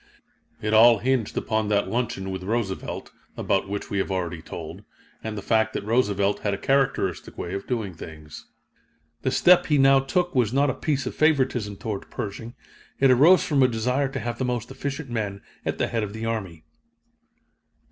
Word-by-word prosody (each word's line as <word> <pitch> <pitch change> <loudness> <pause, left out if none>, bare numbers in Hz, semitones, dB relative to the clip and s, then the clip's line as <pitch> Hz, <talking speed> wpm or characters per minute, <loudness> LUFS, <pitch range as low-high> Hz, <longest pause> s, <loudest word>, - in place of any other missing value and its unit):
It 110 0 0
all 115 +1 +7
hinged 125 0 -1
upon 110 -1 0
that 100 -1 +1
luncheon 110 -3 -2
with 95 0 -5
Roosevelt, 100 -1 -3 0.3
about 95 0 0
which 100 0 -5
we 100 - 0
have 95 - -1
already 90 -3 -3
told, - - -8 0.4
and 110 -1 -4
the 100 - -5
fact 110 -1 +2
that - - -4
Roosevelt 105 -3 +1
had 100 -1 -1
a - - -7
characteristic 135 -10 0
way 85 - -5
of 100 0 -5
doing 110 -7 -2
things. 75 -2 -11 0.7
The - - 0
step 175 +7 +5
he 150 - +3
now 135 0 +6
took 175 +7 -1
was 120 -6 +2
not 140 +1 +2
a - - -4
piece 140 0 -1
of - - -3
favoritism 130 -9 +1
toward 105 -1 -5
Pershing 115 +3 -6 0.4
it 135 -1 +5
arose 155 +9 +6
from 145 -4 +1
a 130 - +6
desire 125 +4 0
to - - -4
have 120 0 -4
the - - 0
most 120 0 -3
efficient 140 0 -5
men 105 -4 -3 0.2
at - - -1
the - - +1
head 115 - -1
of 105 -1 -4
the 110 +1 -5
army. 95 -8 -4
115 Hz, 190 wpm, -25 LUFS, 100-130 Hz, 0.7 s, all